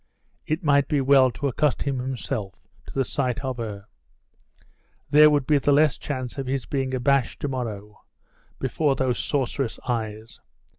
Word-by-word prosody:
It 155 Hz, +3 st, -1 dB
might 140 Hz, -2 st, +3 dB
be 150 Hz, -, +1 dB
well 135 Hz, -1 st, +5 dB
to 140 Hz, +3 st, -3 dB
accustom 140 Hz, -1 st, 0 dB
himself 125 Hz, -5 st, -5 dB, 0.2 s
to -, -, -9 dB
the 135 Hz, -1 st, +1 dB
sight 130 Hz, -2 st, -1 dB
of 130 Hz, -2 st, -3 dB
her. 105 Hz, -4 st, -6 dB, 1.3 s
There 150 Hz, +1 st, +8 dB
would 145 Hz, -3 st, +1 dB
be 150 Hz, 0 st, +3 dB
the 145 Hz, -, +1 dB
less 145 Hz, 0 st, +4 dB
chance 130 Hz, -2 st, -5 dB
of 135 Hz, -, -4 dB
his 135 Hz, -1 st, -2 dB
being 135 Hz, -2 st, -2 dB
abashed 135 Hz, 0 st, +1 dB
to -, -, -1 dB
morrow 105 Hz, -6 st, -5 dB, 0.6 s
before 135 Hz, +2 st, 0 dB
those 130 Hz, -2 st, 0 dB
sorceress 135 Hz, -3 st, -1 dB
eyes. 110 Hz, -2 st, -4 dB
130 Hz, 155 wpm, -24 LUFS, 120-140 Hz, 1.3 s, There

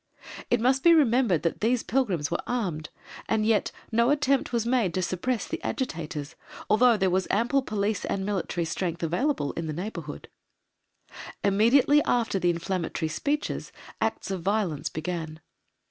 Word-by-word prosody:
It 240 Hz, -, +3 dB
must 260 Hz, +3 st, +2 dB
be 340 Hz, +2 st, +7 dB
remembered 240 Hz, -, +3 dB
that 165 Hz, -, -1 dB
these 235 Hz, +2 st, +2 dB
pilgrims 195 Hz, -, 0 dB
were -, -, -1 dB
armed, 180 Hz, -11 st, -2 dB, 0.4 s
and 215 Hz, -1 st, +1 dB
yet 220 Hz, -1 st, +2 dB, 0.2 s
no 235 Hz, +2 st, +3 dB
attempt 280 Hz, -3 st, +2 dB
was 235 Hz, -2 st, 0 dB
made 235 Hz, -8 st, +1 dB
to 185 Hz, -, +1 dB
suppress 220 Hz, +7 st, -2 dB
the -, -, -4 dB
agitators, 160 Hz, -, -4 dB, 0.4 s
although 230 Hz, +1 st, +5 dB
there 190 Hz, -2 st, +1 dB
was 185 Hz, +1 st, +1 dB
ample 240 Hz, +7 st, +2 dB
police 210 Hz, -3 st, -2 dB
and 195 Hz, -1 st, -2 dB
military 185 Hz, -4 st, -2 dB
strength 170 Hz, 0 st, -3 dB
available 175 Hz, -, 0 dB
in 165 Hz, -1 st, -5 dB
the 155 Hz, -, -3 dB
neighbourhood. 185 Hz, +8 st, -6 dB, 1.2 s
Immediately 235 Hz, +9 st, +4 dB
after 230 Hz, -7 st, +1 dB
the 175 Hz, -, +2 dB
inflammatory 170 Hz, -2 st, -2 dB
speeches, 290 Hz, -, -2 dB, 0.3 s
acts -, -, -1 dB
of 190 Hz, -2 st, -3 dB
violence 185 Hz, -6 st, -1 dB
began. 160 Hz, -1 st, -5 dB
205 Hz, 150 wpm, -27 LUFS, 170-245 Hz, 1.2 s, be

